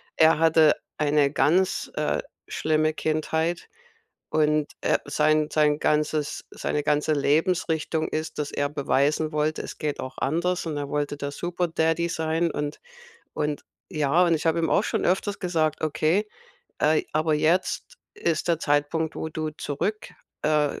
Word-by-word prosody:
er 160 0 +5
hatte 160 -1 +5 0.2
eine 145 -2 +2
ganz, 180 +6 +1
äh, - - 0 0.3
schlimme 155 0 +1
Kindheit 160 +2 -1 0.6
und, 150 -1 +2
äh, - - +2
sein 155 0 +2
sein 150 -1 +3
ganzes 150 -1 0
seine 150 - -2
ganze 150 +1 +1
Lebensrichtung 160 +2 +1
ist, 155 0 -4
dass 145 -1 -2
er 145 - -1
beweisen 145 +2 +1
wollte: 155 +1 0
„Es - - -8
geht 150 -2 -2
auch 130 - -7
anders.“ 170 +4 0
Und 155 - -3
er 145 -1 -3
wollte 145 0 -2
der 145 0 -4
super 175 +3 -2
Daddy 165 +1 +1
sein 165 +1 0
und 145 -1 -4 0.5
und 150 -1 -2 0.3
ja, 155 +4 +3
und 170 -1 +3
ich 155 - -2
hab 165 +1 +3
ihm 165 -1 0
auch - - +3
schon - - -1
öfters 195 +2 0
gesagt: 160 -4 0
„Okay, 155 +6 +1 0.5
äh 155 +1 +3
aber 155 0 +2
jetzt 175 - 0 0.2
ist 170 - -1
der 165 - +2
Zeitpunkt, 150 +2 0
wo 160 - -3
du 155 0 -3
zurück 155 +8 -3 0.3
äh, 150 -1 +1
dich - - -11
155 Hz, 155 wpm, -25 LUFS, 150-165 Hz, 0.6 s, er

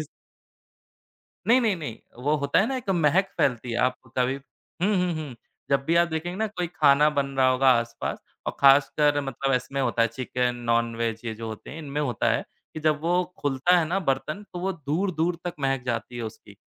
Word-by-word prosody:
इस - - -6 1.4
नहीं, 250 +2 +6
नहीं, 215 -6 +1
नहीं, 145 -9 -6 0.3
वो 150 +1 +3
होता 140 - +2
है 210 - +2
ना 270 - -2
एक 230 -6 -7
महक 175 +2 +3
फैलती 120 -2 +1
है। 115 - -1
आप 125 0 +2 0.2
कभी 130 +1 +2 0.5
हुँ, 205 +2 +3
हुँ, 180 -1 +1
हुँ, 150 -5 -5 0.4
जब 140 0 +2
भी 165 - +1
आप 170 0 +4
देखेंगे 170 +2 -3
ना 220 - +1
कोई 180 -4 -3
खाना 150 -3 +4
बन 140 -2 0
रहा 130 -1 +5
होगा 130 +1 +3
आस-पास 115 0 -5 0.3
और - - -3
खासकर 145 +1 +5
मतलब 135 0 -2
इसमें 130 +2 -2
होता 120 -3 +1
है 115 - +3
चिकन, 125 +1 -2
नॉन 115 0 +2
वेज 115 -1 -2
ये 110 -1 -3
जो 115 +1 -7
होते 110 - -8
हैं, 155 - -8
इनमें 145 -1 -4
होता 125 -7 0
है - - +1 0.3
कि 155 - -5
जब 155 -1 +1
वो 175 +2 +2 0.2
खुलता 145 +6 +3
है 165 - +2
ना 190 +3 +1
बर्तन, 150 +8 -1
तो 180 - -5
वो 190 +1 -1
दूर-दूर 165 +2 -1
तक 175 -1 -3
महक 135 -2 0
जाती 120 0 -3
है 120 - -4
उसकी। 110 -2 -9
140 Hz, 210 wpm, -25 LUFS, 125-170 Hz, 1.4 s, नहीं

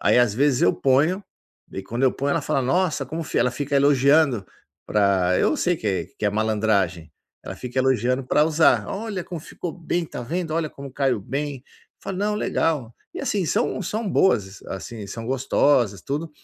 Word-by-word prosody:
Aí - - +4
às 120 -4 +3
vezes 135 +1 +2
eu - - +5
ponho, 150 +9 +2 0.5
e - - -12
aí 95 - -3
quando 120 +5 -4
eu 130 - +4
ponho 140 +1 -2
ela - - +1
fala: 135 - 0
"Nossa, 150 +1 0
como", 160 +5 -4
ela 125 - +3
fica 145 +2 -2
elogiando 140 -3 +4 0.4
para 95 -3 +2
eu - - +2
sei 175 -1 +1
que 110 - -6
é 95 -4 0
que - - -4
é - - +2
malandragem. 105 -6 0 0.3
Ela - - -6
fica 125 +1 -5
elogiando 130 0 +1
para 150 +4 +3
usar, 160 0 +3
"Olha 205 -2 -4
como 175 -3 -6
ficou 165 +2 -6
bem, 175 0 -2
está 155 - -7
vendo, 165 +6 -3
olha 160 -1 0
como 140 -2 -10
caiu 130 -5 0
bem". 140 +6 -4
Eu - - -28
falo, 195 - -4
"Não, 210 +1 0
legal". 150 - -1 0.2
E - - -4
assim, 195 -4 -1
são 215 +5 0
são 215 +4 -3
boas, 105 - +2
assim, 105 +2 -7
são 115 +3 -7
gostosas, 125 -4 +2
tudo, 150 +4 -3
135 Hz, 195 wpm, -23 LUFS, 110-160 Hz, 0.5 s, eu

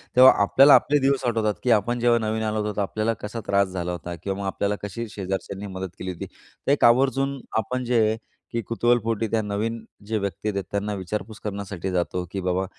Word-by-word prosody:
तेव्हा 130 +1 +9
आपल्याला 135 +7 +7
आपले 145 +1 +3
दिवस 135 -1 +1
आठवतात, 110 -3 +1
की 125 - +2
आपण 115 +3 +2
जेव्हा 120 0 +4
नवीन 110 +1 -1
आलो 110 0 0
होतो 105 -1 -3
तर - - +2
आपल्याला 110 +3 0
कसा 105 +3 -5
त्रास 100 0 +3
झाला 90 -1 -3
होता 85 0 -5
किंवा 95 +4 -4
मग 100 - -4
आपल्याला 100 +1 -1
कशी 115 +3 -4
शेजारच्यांनी 100 0 -4
मदत 95 0 -4
केली 95 - -3
होती. 85 - -6
तर - - -6
एक 145 - +2
आवर्जून 135 +3 +3 0.2
आपण 125 +4 -1
जे, 110 -3 +2 0.3
की 115 - -1
कुतूहलपोटी 115 -1 +1
त्या 115 - +2
नवीन 110 +2 -3 0.2
जे 110 0 0
व्यक्ती 100 0 -3
आहेत, 100 -2 -2
त्यांना 100 +1 -1
विचारपूस 105 +3 -5
करण्यासाठी 100 -3 -4
जातो. 90 0 -1
की 95 - -3
बाबा 90 +1 0
105 Hz, 200 wpm, -24 LUFS, 100-115 Hz, 0.3 s, तेव्हा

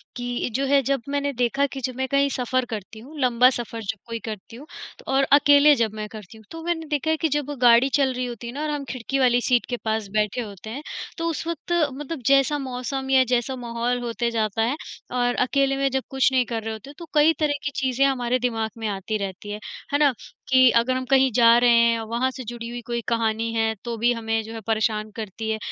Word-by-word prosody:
कि 245 0 -3
जो 275 +2 +1
है 275 0 +4
जब 275 0 0
मैंने 285 0 -1
देखा 250 +3 +1
कि 270 - -5
जब 255 0 -3
मैं 265 +1 -2
कहीं 280 +1 +2
सफ़र 255 -1 -1
करती 220 -1 -7
हूँ, 285 +7 -12
लंबा 250 -1 +5
सफ़र 235 -2 -5
जब 220 +1 -4
कोई 230 0 -4
करती 215 0 -7
हूँ 270 +5 -11 0.4
और 270 +1 +2
अकेले 290 0 +7
जब 225 -4 0
मैं 215 -1 -5
करती 215 0 -11
हूँ, 220 - -17
तो 325 0 -8
मैंने 335 -1 -2
देखा 300 +1 -1
है 320 - +1
कि 320 - +1
जब 290 0 -1
वो 290 - -4
गाड़ी 240 +2 +6
चल 270 -2 +2
रही 250 0 -2
होती 235 -1 -7
है 235 - -6
ना, 290 - -5
और 310 - -2
हम 295 -1 -2
खिड़की 260 +2 -3
वाली 245 -2 +4
सीट 245 -1 +2
के 245 - -2
पास 220 -1 -1
बैठे 215 +2 0
होते 205 -2 -9
हैं, 270 +7 -6 0.3
तो 330 0 -2
उस 325 - -4
वक़्त 335 0 -5 0.2
मतलब 290 +2 -6
जैसा 275 +1 +4
मौसम 265 +1 -4
या 260 -1 +5
जैसा 245 +2 0
माहौल 240 0 -2
होते 235 0 -2
जाता 220 -1 -1
है 240 +5 +1 0.4
और 245 -1 +1
अकेले 275 0 +1
में 275 0 +1
जब 265 0 -1
कुछ 265 0 +2
नहीं 255 -1 +2
कर 225 -1 -4
रहे 225 0 -3
होते 245 +6 -10
तो 340 - -9
कई 305 +2 +5
तरह 300 -2 +2
की 290 - -2
चीज़ें 265 0 +1
हमारे 255 -2 +1
दिमाग़ 225 -3 -1
में 220 - -2
आती 200 +2 -2
रहती 200 0 -6
हैं। 210 - -5 0.3
है 285 - +4
ना? 285 -3 +4 0.4
कि 260 -1 +7
अगर 235 +2 +3
हम 255 0 -2
कहीं 265 -1 +4
जा 230 0 +6
रहे 240 0 +5
हैं 230 -1 +3
और 225 - -5
वहाँ 235 +3 0
से 260 0 -8
जुड़ी 235 0 -7
हुई 240 0 -6
कोई 235 0 -2
कहानी 230 -1 0
है 225 -1 +1
तो 235 -1 -4
भी 240 +2 +2
हमें 225 -1 -1
जो 225 +1 -9
है 225 - -6
परेशान 215 -1 0
करती 220 0 -5
है 220 - 0
245 Hz, 245 wpm, -24 LUFS, 225-275 Hz, 0.4 s, अकेले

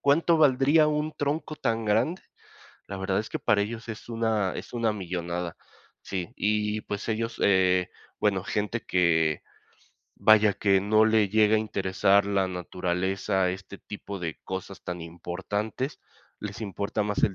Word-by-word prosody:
¿cuánto 165 +4 +3
valdría 145 +2 +5
un 150 +1 -1
tronco 150 +2 -2
tan 115 -5 -1
grande? 115 - +1 0.6
La 95 - -6
verdad 95 +1 -1
es 110 - -3
que - - -3
para 100 0 +3
ellos 115 +2 -6
es 115 0 -7
una 110 -4 0
es - - -7
una 115 -2 +1
millonada. 90 -3 -4 0.4
Sí, 90 -3 -4
y, 105 0 0
pues, 105 +1 -5
ellos, 115 +1 -2
eh, 95 -2 +3 0.3
bueno, 100 -3 +1
gente 105 +3 -2
que, 80 -4 +2 0.7
vaya, 110 -1 +5
que 100 -2 +3
no 110 +2 +4
le 110 -2 +3
llega 110 +1 +4
a - - +3
interesar 100 -1 +2
la 100 -2 +1
naturaleza, 90 +1 -1
este 95 +2 -7
tipo 100 0 -8
de 85 -3 -4
cosas 95 +1 -6
tan 90 -2 -5
importantes, 95 - -4 0.4
les 105 +1 -7
importa 100 0 -2
más 105 -1 -2
el 95 - 0
105 Hz, 150 wpm, -27 LUFS, 95-110 Hz, 0.7 s, valdría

